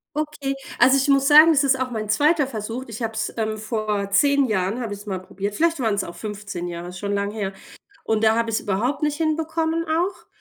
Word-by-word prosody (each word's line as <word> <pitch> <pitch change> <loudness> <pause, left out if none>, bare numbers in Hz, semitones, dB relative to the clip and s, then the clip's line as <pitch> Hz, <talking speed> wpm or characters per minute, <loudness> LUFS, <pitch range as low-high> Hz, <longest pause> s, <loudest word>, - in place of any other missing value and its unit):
Okay. 300 -3 -3 0.2
Also 260 +3 +6
ich 270 - +1
muss 275 0 +4
sagen, 310 +2 +8
das 295 -2 +3
ist 265 -1 +2
auch 260 -1 -2
mein 215 -2 -4
2. 295 +5 +3
Versuch. 230 +1 -5
Ich 230 +1 -6
habe 225 - -2
es 220 0 -2
ähm, 220 -1 -1
vor 215 -2 -2
10 280 +6 +4
Jahren, 200 +1 -1
habe 220 -3 -4
ich 200 - -9
es - - -14
mal 190 -3 -3
probiert. 200 +2 -5
Vielleicht 330 +2 +1
waren 225 -5 +1
es 200 - -1
auch 170 - -8
15 205 -4 -6
Jahre, 175 0 -6
ist 180 0 -9
schon 205 0 -2
lange 200 0 -1
her. 195 -3 -3 0.5
Und 220 0 +1
da 220 +1 +4
habe 230 0 0
ich's 225 - 0
überhaupt 235 +9 -1
nicht 295 -1 0
hinbekommen 320 +1 -1
auch. 340 +5 -1
225 Hz, 235 wpm, -22 LUFS, 205-285 Hz, 0.5 s, sagen